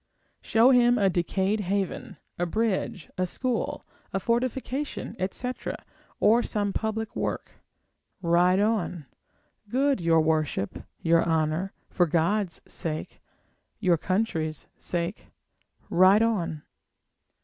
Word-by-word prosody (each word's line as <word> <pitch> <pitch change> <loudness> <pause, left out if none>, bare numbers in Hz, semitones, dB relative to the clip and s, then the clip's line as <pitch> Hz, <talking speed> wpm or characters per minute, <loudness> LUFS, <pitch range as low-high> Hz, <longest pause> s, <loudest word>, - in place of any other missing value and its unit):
Show 230 +4 +5
him 245 -1 +5
a 195 -4 +3
decayed 190 +4 0
haven, 195 -1 -2 0.2
a 175 - +1
bridge, 195 -4 -1
a 185 - +1
school, 250 +5 -2 0.3
a 195 - -1
fortification, 255 +5 -2
etc., 250 +7 -3 0.4
or 230 +3 +5
some 205 -4 -1
public 220 0 -2
work, - - -4 0.6
ride 180 +1 +3
on; 200 -7 0 0.6
good 270 -1 +2
your 165 -1 +4
worship, 155 -10 -1 0.2
your 165 0 +4
honour, 160 +3 0 0.2
for 175 -2 +2
God's 175 +4 0
sake, 155 -2 -4 0.6
your 180 -5 +3
country's 165 -6 -1
sake, 175 +3 -3 0.6
ride 190 +5 +5
on. 175 -9 -1
190 Hz, 105 wpm, -27 LUFS, 170-225 Hz, 0.6 s, Show